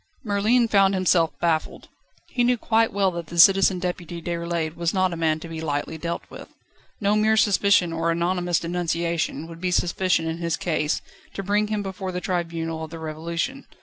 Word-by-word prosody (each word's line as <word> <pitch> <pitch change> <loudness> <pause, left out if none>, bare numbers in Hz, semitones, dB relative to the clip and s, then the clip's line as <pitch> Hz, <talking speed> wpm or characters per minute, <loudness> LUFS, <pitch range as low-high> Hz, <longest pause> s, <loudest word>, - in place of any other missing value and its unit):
Merlin 220 +3 +2
found 195 -2 +4
himself 175 -3 +3
baffled. 165 -2 -1 0.4
He 245 - 0
knew 245 0 +3
quite 225 0 +2
well 195 -1 +1
that 170 0 -5
Citizen 195 +1 +6
Deputy 175 -1 -4
Déroulède 170 -1 -3
was 170 +2 -1
not 185 -1 +2
a - - -3
man 160 -1 0
to 170 - -7
be 165 -1 -6
lightly 145 0 -2
dealt 170 +1 -3
with. - - -11 0.5
No 205 0 +2
mere 220 +1 +3
suspicion 200 -4 +3
or 165 0 -1
anonymous 175 +1 0
denunciation 170 -2 -2
would 165 0 -11
be 185 - 0
sufficient 180 -1 +1
in 160 0 -3
his 170 -3 -1
case, 155 -3 -1 0.3
to 195 - -4
bring 205 +2 +1
him 210 -1 -2
before 190 -1 -5
the 180 - -3
tribunal 165 -3 -3
of 160 - -7
the 165 - -8
Revolution. 165 - -4
175 Hz, 180 wpm, -24 LUFS, 165-195 Hz, 0.5 s, Citizen